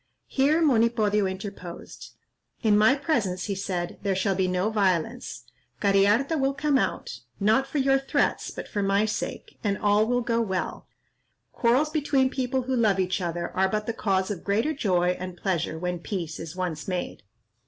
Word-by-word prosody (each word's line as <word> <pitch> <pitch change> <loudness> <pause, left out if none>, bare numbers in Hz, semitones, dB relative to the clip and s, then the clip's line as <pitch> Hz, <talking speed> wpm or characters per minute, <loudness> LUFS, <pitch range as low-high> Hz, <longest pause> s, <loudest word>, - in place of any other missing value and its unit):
Here 295 +5 +2
Monipodio 225 -6 +3
interposed: 190 -2 -8 0.5
"In 215 -2 +4
my 215 +6 +5
presence," 230 - -1
he 205 - -2
said, 185 -3 -3
"there 195 -1 0
shall 195 +1 +1
be 190 0 +1
no 185 +4 0
violence. 205 +3 -1 0.4
Cariharta 205 +10 +3
will 270 0 +1
come 295 -2 +2
out, - - -3 0.2
not 220 +6 +3
for 280 - -4
your 270 0 +3
threats, 270 - 0
but - - -7
for 205 - -2
my 200 +1 +2
sake, 215 - -5
and 200 -2 0
all 210 +1 +3
will 245 +1 +1
go 230 -1 0
well. 190 -5 -3 0.6
Quarrels 255 +6 +2
between 275 -4 +1
people 260 -1 -1
who 260 +1 -1
love 215 -5 +2
each 185 +1 0
other 170 0 -3
are 190 0 +2
but 210 +1 -1
the 230 - -2
cause 195 -3 0
of 190 - -5
greater 220 +10 +1
joy 180 - +1
and 185 -1 -6
pleasure 175 -5 -1
when 180 +1 -3
peace 170 -3 -4
is 165 +1 -7
once 175 -5 -3
made. 180 -2 -3
205 Hz, 175 wpm, -26 LUFS, 185-250 Hz, 0.6 s, my